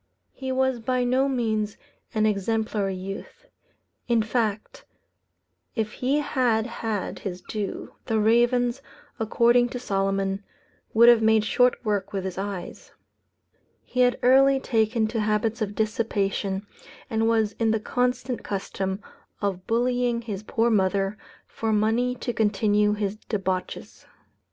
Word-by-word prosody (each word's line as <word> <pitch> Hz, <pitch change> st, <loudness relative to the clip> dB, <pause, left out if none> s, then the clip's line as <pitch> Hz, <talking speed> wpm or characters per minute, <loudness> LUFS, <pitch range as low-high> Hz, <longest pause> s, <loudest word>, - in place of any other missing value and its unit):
He 265 Hz, -1 st, -5 dB
was 260 Hz, -1 st, +1 dB
by 255 Hz, +2 st, 0 dB
no 260 Hz, +3 st, +2 dB
means 220 Hz, -5 st, -1 dB, 0.4 s
an 215 Hz, 0 st, +3 dB
exemplary 210 Hz, -1 st, 0 dB
youth. 195 Hz, -, -8 dB, 0.6 s
In 235 Hz, -2 st, +3 dB
fact, 225 Hz, -, -2 dB, 0.9 s
if 220 Hz, -2 st, -1 dB
he 265 Hz, +6 st, 0 dB
had 245 Hz, -6 st, +1 dB
had 225 Hz, -4 st, -4 dB
his 185 Hz, -3 st, -5 dB
due, 210 Hz, -3 st, -5 dB
the 225 Hz, -, +1 dB
ravens, 240 Hz, +3 st, +3 dB, 0.4 s
according 235 Hz, +2 st, +3 dB
to 250 Hz, -, -5 dB
Solomon, 195 Hz, -1 st, -1 dB, 0.5 s
would 235 Hz, +2 st, +7 dB
have 240 Hz, -2 st, +7 dB
made 220 Hz, -1 st, +4 dB
short 250 Hz, +3 st, +3 dB
work 205 Hz, -2 st, -1 dB
with 195 Hz, -2 st, -2 dB
his 190 Hz, 0 st, -4 dB
eyes. 195 Hz, -2 st, -6 dB, 0.9 s
He 255 Hz, -, -5 dB
had 245 Hz, -1 st, +4 dB
early 270 Hz, +2 st, +5 dB
taken 225 Hz, -2 st, +1 dB
to 225 Hz, 0 st, -2 dB
habits 215 Hz, +2 st, 0 dB
of 205 Hz, -1 st, -2 dB
dissipation, 205 Hz, -3 st, -1 dB, 0.4 s
and 225 Hz, 0 st, 0 dB
was 220 Hz, -2 st, +2 dB
in 225 Hz, -1 st, +2 dB
the 220 Hz, 0 st, +2 dB
constant 250 Hz, +2 st, -1 dB
custom 190 Hz, 0 st, -3 dB, 0.4 s
of 190 Hz, -3 st, -3 dB
bullying 240 Hz, 0 st, +1 dB
his 205 Hz, -4 st, -5 dB
poor 225 Hz, +2 st, +1 dB
mother, 195 Hz, -1 st, +1 dB, 0.3 s
for 225 Hz, -1 st, -3 dB
money 225 Hz, +4 st, +1 dB
to 240 Hz, -1 st, -4 dB
continue 210 Hz, -1 st, +2 dB
his 205 Hz, 0 st, -2 dB
debauches. 190 Hz, -4 st, -3 dB
220 Hz, 130 wpm, -25 LUFS, 205-245 Hz, 0.9 s, would